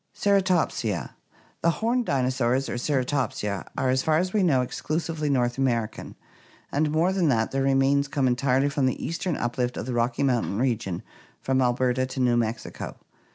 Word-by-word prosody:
Ceratopsia. 185 - +1 0.3
— - - -32
The 170 - +3
horned 230 +7 0
dinosaurs, 130 -1 +1
or 120 - -3
Ceratopsia, 125 -7 -1
are, 130 - +1
as 130 0 +2
far 155 +2 +2
as 180 +2 -1
we 210 - +2
know, 140 -9 +3
exclusively 155 +3 -3
North 125 -2 +1
American, 120 -5 -1 0.6
and 150 +2 +1
more 165 +5 +2
than 185 -4 +2
that, 115 -4 +1
their 135 - 0
remains 135 +1 +3
come 140 -1 0
entirely 130 +2 +2
from 140 -2 +1
the 130 - -2
eastern 170 0 -2
uplift 120 +1 -2
of - - -4
the 125 - -3
Rocky 120 +2 0
Moun 125 -4 +2
tain 100 - -3
region 115 -7 -1 0.4
from 130 0 +1
Alberta 125 +1 +1
to 130 - -6
New 125 -2 +3
Mexico. 115 -1 -3
130 Hz, 175 wpm, -25 LUFS, 120-150 Hz, 0.6 s, The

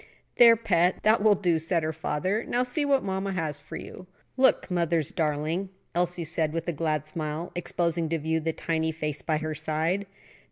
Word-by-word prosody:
"There, 235 -1 +9
pet, 180 -6 +1
that 215 0 +4
will 210 -1 +5
do," 175 -4 +1
said 165 +1 0
her 155 0 -1
father. 185 +7 -1
"Now, 245 - 0
see 255 +4 0
what 275 -2 +2
mamma 190 0 -2
has 155 -5 -2
for 150 - -10
you." 185 - -9 0.3
"Look, 260 -6 +3
mother's 170 -3 +1
darling," 160 +3 -1 0.2
Elsie 175 0 0
said 160 -1 +1
with 165 +1 -3
a 170 - 0
glad 155 -1 -1
smile, 155 +2 -4
exposing 170 -2 -1
to 165 - 0
view 160 +1 -1
the 160 +1 -1
tiny 160 0 -1
face 150 -3 -3
by 155 +4 0
her 155 0 -3
side. 160 +6 -1
165 Hz, 190 wpm, -27 LUFS, 155-190 Hz, 0.3 s, There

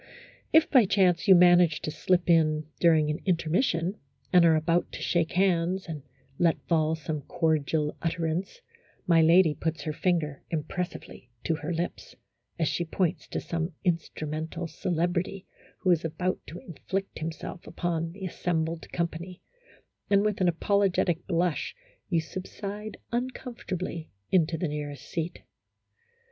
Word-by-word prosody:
If, 320 0 +6
by 255 -6 +6
chance, 185 -2 +3
you 190 - +9
manage 175 -3 +6
to 155 - -3
slip 175 +3 +1
in 155 -2 +3
during 155 -3 +4
an 150 - -3
in 185 -3 +2
termission, 170 +2 0 0.3
and 180 -1 +7
are 165 -1 +6
about 165 +2 +1
to - - -6
shake 170 -2 0
hands, 185 0 +2
and 155 -3 -5 0.4
let 170 -2 +3
fall 160 -1 +2
some 155 -1 -4
cordial 155 -1 0
utterance, 165 - -2 0.4
my 165 -2 +5
lady 165 0 +6
puts 160 +1 -3
her 155 - -2
finger 155 -4 0
impressively 165 -5 -5
to 165 - +1
her 160 +2 -4
lips, 170 +1 -4 0.4
as 165 -2 +1
she 175 - 0
points 170 -1 -1
to - - -3
some 165 +1 -3
in 175 -3 +3
strumental 155 +2 -5
celebrity 175 +3 -2 0.4
who 185 - +3
is 170 -1 +3
about 170 +3 -1
to 170 - -8
inflict 190 +3 -5
himself 165 +2 -6
upon 165 -2 -2
the 190 +2 -7
assembled 165 -2 -2
company, 170 +1 -4 0.7
and 200 0 +4
with 210 -2 0
an 180 - +4
apolo 200 +4 +2
getic 175 -1 0
blush 175 - 0 0.3
you 170 -3 +2
subside 200 +5 -6
uncomfortably 235 -9 -4 0.2
into 165 -3 +3
the 175 - -1
nearest 145 -2 -5
seat. 165 +1 -4
170 Hz, 145 wpm, -28 LUFS, 160-185 Hz, 0.7 s, you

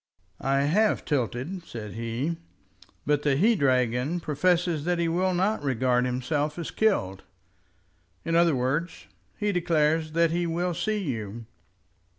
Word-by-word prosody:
"I 135 0 +2
have 200 +10 +2
tilted," 140 - -2
said 110 - -8
he, 115 +8 -3 0.7
"but 145 0 +2
the 145 -2 +2
he 210 +11 +4
dragon 130 - +1
professes 170 0 +1
that 175 0 +1
he 170 0 +1
will 180 +2 +1
not 195 +3 +1
regard 125 -2 +1
himself 145 +5 -1
as 170 - -5
killed. 95 - 0 1.0
In 165 - 0
other 170 -3 +4
words 140 +7 -2 0.3
he 210 0 0
declares 160 -3 +1
that 165 0 +3
he 175 +1 0
will 175 +2 -1
see 215 +5 -1
you." 115 - -4
155 Hz, 140 wpm, -26 LUFS, 130-175 Hz, 1.0 s, he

